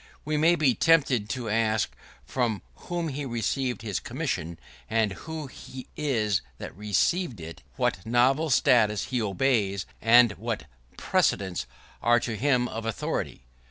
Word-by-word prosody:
We 155 +1 -1
may 165 +3 +4
be 150 -6 +3
tempted 135 -9 +3
to 125 -2 -3
ask 110 - +1 0.3
from 120 -5 -1
whom 170 -2 -4
he 145 +1 -4
received 125 0 -2
his 105 -4 -2
commission, 85 +1 -3 0.3
and 110 -3 +1
who 160 +6 -6
he 130 -1 -10
is 110 -10 0 0.2
that - - -8
received 105 - 0
it; 80 0 -9
what 90 - 0
novel 130 +7 +2
statutes 115 -6 +3
he 125 - +1
obeys, 100 -2 +1 0.2
and 120 0 +6
what 115 - -3 0.3
precedents 95 -3 0 0.3
are 120 0 +4
to 115 -1 -3
him 125 +1 +2
of 115 -1 -5
authority. 110 - -3
120 Hz, 140 wpm, -27 LUFS, 105-135 Hz, 0.3 s, and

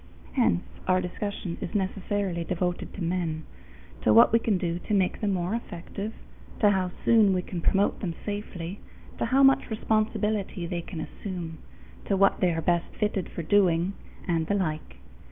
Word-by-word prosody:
Hence 235 -8 +2 0.2
our 185 0 +4
discussion 185 -1 -4
is - - -5
necessarily 190 -2 -1
devoted 180 0 -2
to 190 - -4
men 165 -2 -1 0.6
to 110 - +3
what 115 - +7
we 230 - +6
can 220 -4 +1
do 175 -1 -2
to 215 - +2
make 190 -2 +1
them 210 -2 +1
more 180 +1 -1
effective, 200 -1 -5 0.5
to 205 -2 +5
how 190 -2 +1 0.2
soon 215 -4 +5
we 180 - 0
can 175 -2 -5
promote 195 +4 +2
them 170 -4 -3
safely, 205 -3 -5 0.4
to - - +1
how 265 +4 +4
much 270 -1 +5
responsibility 215 -3 0
they 170 0 -3
can 165 -1 -6
assume, 170 -2 -6 0.5
to 195 - +1
what 195 0 +4
they 180 - +3
are 165 -1 -1
best 170 0 +1
fitted 210 -3 0
for 170 - -5
doing, 180 0 +3 0.3
and 165 -3 +1
the 200 - +1
like. 155 -6 -2
185 Hz, 170 wpm, -27 LUFS, 170-205 Hz, 0.6 s, what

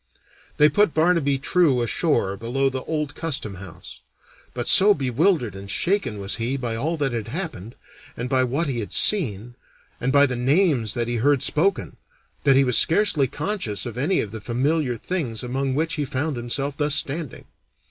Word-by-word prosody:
They 150 - +6
put 205 +3 +2
Barnaby 160 -4 +2
True 140 -3 +2
ashore 115 - 0
below 130 +6 -1
the 130 -1 -5
old 150 -3 -3
custom 140 - -4
house; 90 -5 -12 0.6
but 120 -1 -4
so 205 +1 +7
bewildered 135 - 0
and 100 0 -10
shaken 155 - -1
was 100 +1 -4
he 120 +4 -2
by 120 -4 -3
all 160 +8 -2
that 140 -3 -1
had 115 -3 -4
happened, 145 - -6 0.4
and 120 - -3
by 130 0 +2
what 135 +7 -1
he 135 -6 -3
had 105 - -6
seen, 120 - +1 0.5
and 125 +2 -1
by 140 0 +5
the 130 -3 -2
names 130 - +1
that 120 -1 -2
he 120 0 -2
heard 140 +3 +2
spoken, 155 - 0 0.5
that 135 - +5
he 135 - +5
was 125 -3 +4
scarcely 165 -6 +3
conscious 145 - -3
of 120 -3 -6
any 150 +10 +1
of 100 - -6
the 110 -1 -7
familiar 130 +3 -1
things 130 -8 -4
among 130 +2 -2
which 160 +2 -1
he 150 - -2
found 145 +2 -3
himself 135 +4 -3
thus 145 -1 +1
standing. 150 -1 -2
135 Hz, 180 wpm, -23 LUFS, 120-155 Hz, 0.6 s, so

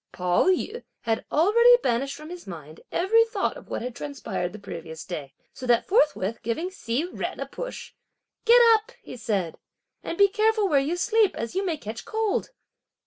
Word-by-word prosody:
Pao 180 -1 +1
yü 400 +5 0 0.2
had 225 -1 -1
already 470 +9 +6
banished 265 +3 0
from 305 +2 -10
his 355 - -9
mind 155 -4 -9
every 445 +6 +4
thought 455 +2 -2
of - - -13
what - - -3
had 245 -1 -5
transpired 225 -11 -4
the 215 - -9
previous 165 -5 -8
day, 150 -7 -7 0.2
so 255 - -7
that 240 -1 +3
forthwith 290 - +2
giving 320 +11 -2
Hsi 310 0 -3
Jen - - -4
a - - -2
push: - - -7 0.5
"Get 475 +1 +7
up!" 440 -1 0
he - - -9
said, 200 -8 -2 0.4
"and 335 - -5
be 400 - +7
careful 435 0 +2
where 290 -6 +4
you 300 +6 -1
sleep, 435 +1 +2
as 230 0 -4
you 385 - 0
may 345 -5 -1
catch 220 -3 -7
cold." 440 -2 -1
300 Hz, 185 wpm, -25 LUFS, -, 0.5 s, Get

